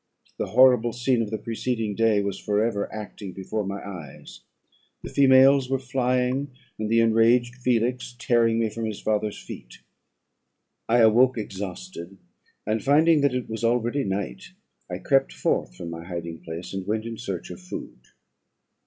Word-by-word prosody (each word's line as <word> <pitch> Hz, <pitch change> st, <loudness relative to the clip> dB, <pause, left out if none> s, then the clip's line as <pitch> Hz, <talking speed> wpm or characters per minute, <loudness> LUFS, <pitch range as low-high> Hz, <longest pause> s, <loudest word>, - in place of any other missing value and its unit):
The -, -, -1 dB
horrible 125 Hz, -1 st, +5 dB
scene 120 Hz, 0 st, +1 dB
of 110 Hz, -, -2 dB
the 110 Hz, -, -2 dB
preceding 115 Hz, -1 st, -3 dB
day 110 Hz, -1 st, +2 dB
was 100 Hz, -1 st, -3 dB
for 105 Hz, 0 st, 0 dB
ever 110 Hz, -2 st, -1 dB
acting 105 Hz, -3 st, -7 dB
before 105 Hz, +3 st, -3 dB
my 100 Hz, 0 st, -4 dB
eyes; 85 Hz, -8 st, -10 dB, 0.6 s
the -, -, -7 dB
females 135 Hz, -1 st, +5 dB
were 135 Hz, -, +1 dB
flying, 130 Hz, +1 st, 0 dB, 0.3 s
and 110 Hz, 0 st, -2 dB
the 115 Hz, +1 st, +4 dB
enraged 115 Hz, +2 st, +3 dB
Felix 125 Hz, 0 st, -1 dB
tearing 115 Hz, -2 st, +2 dB
me 115 Hz, -1 st, +1 dB
from 115 Hz, +1 st, -4 dB
his 110 Hz, -2 st, -4 dB
father's 105 Hz, -1 st, -1 dB
feet. -, -, -10 dB, 1.1 s
I 120 Hz, +1 st, +4 dB
awoke 120 Hz, +3 st, +5 dB
exhausted; 100 Hz, -, -7 dB, 0.5 s
and, 110 Hz, +1 st, -1 dB
finding 155 Hz, +2 st, +4 dB
that 140 Hz, -3 st, +2 dB
it 125 Hz, -, -3 dB
was 110 Hz, +1 st, -5 dB
already 120 Hz, +4 st, +1 dB
night, 95 Hz, -10 st, -4 dB, 0.4 s
I -, -, -3 dB
crept -, -, +2 dB
forth 65 Hz, -1 st, -1 dB
from 85 Hz, +7 st, -7 dB
my 85 Hz, 0 st, -7 dB
hiding 85 Hz, -2 st, -6 dB
place, 85 Hz, +3 st, -7 dB
and 95 Hz, -1 st, -5 dB
went 110 Hz, +1 st, -1 dB
in 115 Hz, -1 st, -6 dB
search 95 Hz, -7 st, -5 dB
of 90 Hz, -, -9 dB
food. 90 Hz, -7 st, -8 dB
115 Hz, 160 wpm, -25 LUFS, 100-125 Hz, 1.1 s, horrible